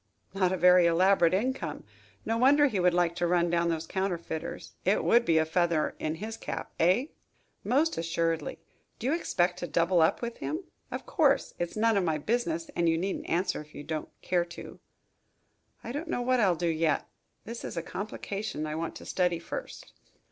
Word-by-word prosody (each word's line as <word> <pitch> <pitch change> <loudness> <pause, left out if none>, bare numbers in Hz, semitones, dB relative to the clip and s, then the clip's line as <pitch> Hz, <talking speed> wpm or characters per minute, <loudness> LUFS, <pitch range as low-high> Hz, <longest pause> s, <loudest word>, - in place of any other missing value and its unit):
"Not 185 -2 +2
a 185 - 0
very 180 -1 +6
elaborate 175 0 +4
income. 260 +7 -2 0.4
No 225 - 0
wonder 285 +4 +6
he 220 -9 0
would 180 -1 +3
like 175 -1 +2
to 175 - +1
run 175 -1 +2
down 170 0 +2
those 165 -1 -2
counterfeiters. 175 -3 -4
It - - +2
would 235 +1 +4
be 165 - +3
a 160 - +3
feather 170 -1 +1
in 155 +1 -2
his 220 +6 -6
cap, - - -5
eh?" 185 +10 +4 0.6
"Most 290 - +1
assuredly. 165 -1 -1 0.4
Do - - -7
you 270 - +2
expect 180 - 0
to 175 - -4
double 170 +2 +2
up 160 - +2
with 235 0 -4
him? 325 +5 -4 0.3
Of - - -5
course, 290 -6 +2
it's 175 +4 -3
none 225 -1 +3
of 195 - +2
my 160 -3 +1
business 290 - -1
and 170 -1 +2
you 165 - +2
needn't 190 +3 -3
answer 180 0 0
if 150 0 -15
you - - -7
don't 155 +1 -4
care 175 -1 +1
to." 170 - -10 1.0
"I - - -5
don't 295 +6 -4
know 245 -7 -1
what 255 0 +2
I'll 190 -6 +4
do 175 - -3
yet. 160 -1 +1 0.4
This 230 +2 -7
is - - -6
a 165 - -1
complication 200 -3 -4
I 155 - -4
want 165 +1 -3
to - - -10
study 180 -2 +1
first." 170 - -7
180 Hz, 195 wpm, -29 LUFS, 165-230 Hz, 1.0 s, very